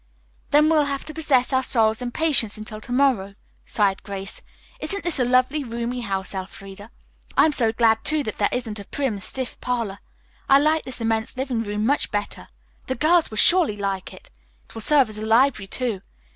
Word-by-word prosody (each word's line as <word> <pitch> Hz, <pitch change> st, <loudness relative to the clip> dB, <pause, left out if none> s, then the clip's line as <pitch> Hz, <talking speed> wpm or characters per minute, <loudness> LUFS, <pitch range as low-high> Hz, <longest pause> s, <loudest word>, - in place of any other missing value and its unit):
"Then 300 Hz, +1 st, +5 dB
we'll 310 Hz, -2 st, +3 dB
have 280 Hz, -1 st, -4 dB
to 310 Hz, -, -8 dB
possess 280 Hz, -5 st, +1 dB
our 260 Hz, -, +3 dB
souls 225 Hz, -3 st, +1 dB
in 245 Hz, -, -3 dB
patience 240 Hz, -7 st, +2 dB
until 215 Hz, 0 st, -8 dB
to 245 Hz, -, -10 dB
morrow," 245 Hz, -7 st, +1 dB, 0.3 s
sighed 200 Hz, -2 st, +1 dB
Grace. 195 Hz, -1 st, -6 dB, 0.4 s
"Isn't 400 Hz, -4 st, -3 dB
this 345 Hz, -5 st, +1 dB
a -, -, +3 dB
lovely, 255 Hz, +4 st, +2 dB
roomy 235 Hz, +1 st, -4 dB
house, 195 Hz, -3 st, -3 dB
Elfreda? 195 Hz, +2 st, -8 dB, 0.5 s
I'm 315 Hz, -, +5 dB
so 235 Hz, -6 st, +1 dB
glad, 225 Hz, -1 st, +2 dB
too, 310 Hz, -1 st, +2 dB
that 215 Hz, -, -5 dB
there 205 Hz, -, +2 dB
isn't 225 Hz, -4 st, -3 dB
a 200 Hz, -, -9 dB
prim, 260 Hz, -6 st, -3 dB
stiff 255 Hz, +6 st, -5 dB
parlor. 230 Hz, -6 st, -3 dB, 0.5 s
I 275 Hz, -, +7 dB
like 310 Hz, +2 st, +1 dB
this 255 Hz, -2 st, -7 dB
immense 225 Hz, +2 st, -1 dB
living 255 Hz, -3 st, -2 dB
room 210 Hz, -1 st, -3 dB
much 285 Hz, +4 st, +1 dB
better. 205 Hz, 0 st, -4 dB, 0.4 s
The 260 Hz, -, -2 dB
girls 320 Hz, +5 st, +3 dB
will 215 Hz, -, -8 dB
surely 335 Hz, -, +5 dB
like 195 Hz, -2 st, -3 dB
it. -, -, -15 dB, 0.4 s
It -, -, -17 dB
will 225 Hz, -, -6 dB
serve 280 Hz, +1 st, +4 dB
as 215 Hz, -1 st, -4 dB
a -, -, -5 dB
library 225 Hz, -2 st, +2 dB
too. 225 Hz, -2 st, -2 dB
235 Hz, 195 wpm, -23 LUFS, 210-275 Hz, 0.5 s, I